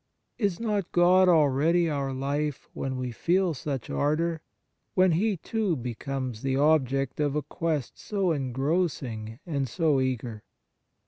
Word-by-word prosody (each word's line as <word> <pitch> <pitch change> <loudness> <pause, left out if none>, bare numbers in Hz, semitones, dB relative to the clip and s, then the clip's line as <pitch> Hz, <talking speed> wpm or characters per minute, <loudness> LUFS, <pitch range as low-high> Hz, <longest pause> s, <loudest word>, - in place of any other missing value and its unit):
Is 200 -6 0
not 210 -5 -1
God 180 +1 +5
already 160 +2 +4
our 140 -3 -1
life 140 +2 -2
when 130 -1 -3
we 125 -1 -3
feel 175 - +1
such 135 -2 -4
ardour, 160 +3 0 0.5
when 185 -1 +5
He, 195 +4 +1
too, 210 0 -1
becomes 125 -1 -4
the 135 -1 0
object 135 -3 +2
of 145 -1 +1
a 150 - 0
quest 155 -2 -3
so 195 -4 0
engrossing 135 -5 -1
and 140 -6 -2
so 155 -1 +2
eager 120 -4 -2
150 Hz, 135 wpm, -27 LUFS, 130-175 Hz, 0.5 s, God